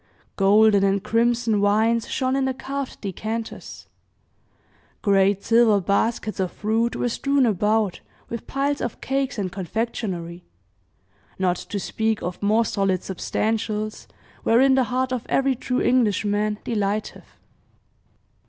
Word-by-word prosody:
Golden 205 +1 +5
and 195 0 +1
crimson 230 -2 +1
wines 220 +3 +2
shone 260 -1 0
in 270 -1 +1
the 265 -1 -1
carved 275 0 -5
decanters; 220 +3 -5 1.2
great 200 -1 +3
silver 230 -3 +4
baskets 210 +3 -1
of 185 -2 -1
fruit 225 +3 -1
were - - -1
strewn 275 +3 +1
about, 210 -1 +1 0.3
with 235 - -7
piles 280 +1 -1
of 240 - -4
cakes 270 -1 -2
and 190 -3 -2
confectionery 180 -3 -4 0.9
not 185 -2 +1
to 205 - -5
speak 220 +2 -1
of 180 +1 -5
more 215 +3 +3
solid 195 -3 0
substantials, 215 +2 -2 0.3
wherein 265 +4 +4
the 260 -1 +3
heart 255 +1 -1
of 245 -2 -2
every 270 0 +2
true 250 0 -2
Englishman 210 -3 +1
delighteth. 210 -1 -3
220 Hz, 125 wpm, -23 LUFS, 200-240 Hz, 1.2 s, Golden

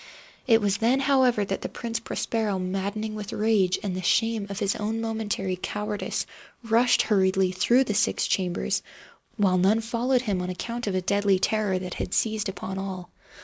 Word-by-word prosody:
It 225 -2 +5
was 205 -1 +1
then, 235 +4 +2
however, 260 -6 +3
that 195 0 -3
the - - -4
Prince 230 -1 -4
Prospero, 220 -4 -2
maddening 195 +4 -3
with 210 -1 -6
rage 205 -4 +2
and 195 -3 -2
the 185 - -3
shame 225 +2 +1
of 200 - -5
his 205 -2 0
own 220 +2 -2
momentary 220 -4 -2
cowardice, 210 0 -3 0.4
rushed 230 +2 +3
hurriedly 190 -3 +2
through 235 +8 +3
the 215 - -2
six - - +1
chambers, 180 -2 0 0.6
while 190 -4 +3
none 200 +5 +4
followed 240 +3 0
him 200 -6 -1
on 180 - -3
account 235 +6 -4
of 195 - -1
a 185 - +1
deadly 200 +1 +2
terror 205 0 +1
that 185 -1 -5
had - - -3
seized 215 -2 0
upon 190 0 -5
all. 185 -2 -6
205 Hz, 180 wpm, -26 LUFS, 190-225 Hz, 0.6 s, It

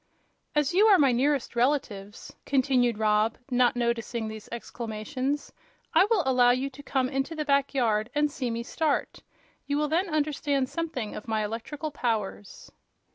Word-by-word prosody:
"As 295 +1 +2
you 410 +4 +5
are 405 -3 +7
my 275 -5 +4
nearest 265 +1 0
relatives," 235 -6 -1
continued 255 -4 +2
Rob, 215 +1 +2
not 245 +1 +3
noticing 235 -1 -1
these 220 -1 -9
exclamations, 240 +5 -4 0.4
"I 385 - +5
will 435 -7 +3
allow 250 -2 +4
you 255 +3 +1
to 275 +2 -11
come 265 -2 0
into 270 +4 -2
the 305 -1 -3
back 280 -1 +1
yard 220 -3 +1
and 295 0 +2
see 260 -4 -3
me 230 0 -3
start. 305 +3 -1 0.5
You 285 0 0
will 300 0 0
then 350 +4 +1
understand 290 -3 0
something 310 -10 -4
of 210 - -8
my 220 -1 0
electrical 255 +8 -5
powers." 215 -6 -3
260 Hz, 160 wpm, -27 LUFS, 230-290 Hz, 0.5 s, are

